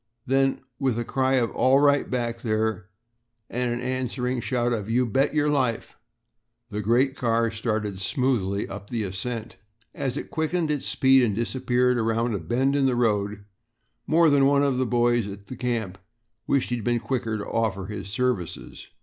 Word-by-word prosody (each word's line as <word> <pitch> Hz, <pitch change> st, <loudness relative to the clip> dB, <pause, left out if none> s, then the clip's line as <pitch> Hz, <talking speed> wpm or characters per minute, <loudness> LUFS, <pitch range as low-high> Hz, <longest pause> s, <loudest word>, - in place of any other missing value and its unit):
Then 135 Hz, +1 st, +1 dB, 0.2 s
with 130 Hz, -5 st, 0 dB
a 120 Hz, -, -2 dB
cry 130 Hz, 0 st, +1 dB
of 120 Hz, -3 st, +1 dB
"All 130 Hz, +2 st, +4 dB
right 145 Hz, 0 st, +3 dB
back 120 Hz, -2 st, -2 dB
there?" 110 Hz, -3 st, -1 dB, 0.6 s
and 125 Hz, 0 st, -1 dB
an 120 Hz, +1 st, -3 dB
answering 125 Hz, 0 st, -2 dB
shout 120 Hz, -1 st, 0 dB
of 110 Hz, -2 st, -3 dB
"You 125 Hz, +2 st, +2 dB
bet 135 Hz, +6 st, +1 dB
your 150 Hz, -1 st, +2 dB
life," 130 Hz, -6 st, 0 dB, 0.8 s
the 105 Hz, +1 st, -2 dB
great 125 Hz, +6 st, +2 dB
car 115 Hz, -2 st, +1 dB
started 110 Hz, -3 st, -2 dB
smoothly 100 Hz, -2 st, 0 dB
up 100 Hz, +1 st, -8 dB
the 115 Hz, -3 st, -2 dB
ascent. 110 Hz, +4 st, -5 dB, 0.4 s
As 135 Hz, 0 st, -3 dB
it -, -, -6 dB
quickened 160 Hz, 0 st, 0 dB
its 145 Hz, -2 st, -2 dB
speed 135 Hz, 0 st, +4 dB
and 110 Hz, -5 st, +1 dB
disappeared 125 Hz, +1 st, +1 dB
around 115 Hz, +1 st, 0 dB
a 100 Hz, -, -1 dB
bend 130 Hz, -, 0 dB
of 140 Hz, -1 st, +3 dB
the 125 Hz, -, +1 dB
road, 105 Hz, -3 st, 0 dB, 0.6 s
more 165 Hz, -1 st, +5 dB
than 140 Hz, -1 st, +5 dB
one 140 Hz, 0 st, +3 dB
of 135 Hz, -3 st, +1 dB
the 130 Hz, -, +1 dB
boys 120 Hz, -2 st, +2 dB
at 100 Hz, 0 st, -9 dB
the 130 Hz, -, -8 dB
camp 115 Hz, -6 st, -3 dB, 0.5 s
wished 135 Hz, -3 st, +1 dB
he 120 Hz, -, +1 dB
had 115 Hz, -, -6 dB
been 120 Hz, -1 st, +2 dB
quicker 115 Hz, -3 st, -2 dB
to 105 Hz, -, -5 dB
offer 100 Hz, -5 st, -1 dB
his 100 Hz, -1 st, -6 dB
services. 115 Hz, -6 st, -3 dB
120 Hz, 180 wpm, -25 LUFS, 110-130 Hz, 0.8 s, more